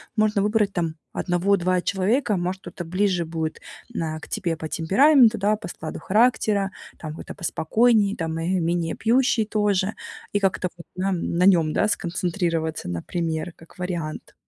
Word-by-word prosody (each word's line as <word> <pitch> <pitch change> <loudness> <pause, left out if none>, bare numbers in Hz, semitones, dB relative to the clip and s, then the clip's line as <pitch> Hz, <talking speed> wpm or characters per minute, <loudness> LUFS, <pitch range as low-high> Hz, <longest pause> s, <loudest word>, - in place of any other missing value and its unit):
Можно 215 -2 +2
выбрать 210 -1 +1
там 165 -3 -1 0.2
1-2 180 0 +1
человека, 205 +4 +1
может, 185 +2 -2
кто-то 175 0 -7
ближе 185 0 0
будет 160 -1 -4 0.3
на 160 -8 -3
к - - -11
тебе 180 -7 -1
по 160 0 -6
темпераменту, 230 - +5
да, 210 +2 +2
по 205 - -8
складу 160 -2 -7
характера, 210 -1 +2 0.3
там 155 -2 -6
какой-то - - -8
поспокойнее, 205 +4 +2
там, 165 -1 -3
э, 165 - -3
менее 170 0 -1
пьющий 235 -1 +2
тоже. 210 -1 0 0.4
И 205 - +2
как-то 190 -2 0
вот 170 - -11
на 190 +2 0
на 175 0 0
нём, 165 -5 +4
да, 210 - +2
сконцентрироваться, 170 - -1
например, 160 - -3
как 165 +2 -18
вариант. 175 -4 -4
185 Hz, 155 wpm, -24 LUFS, 165-210 Hz, 0.4 s, темпераменту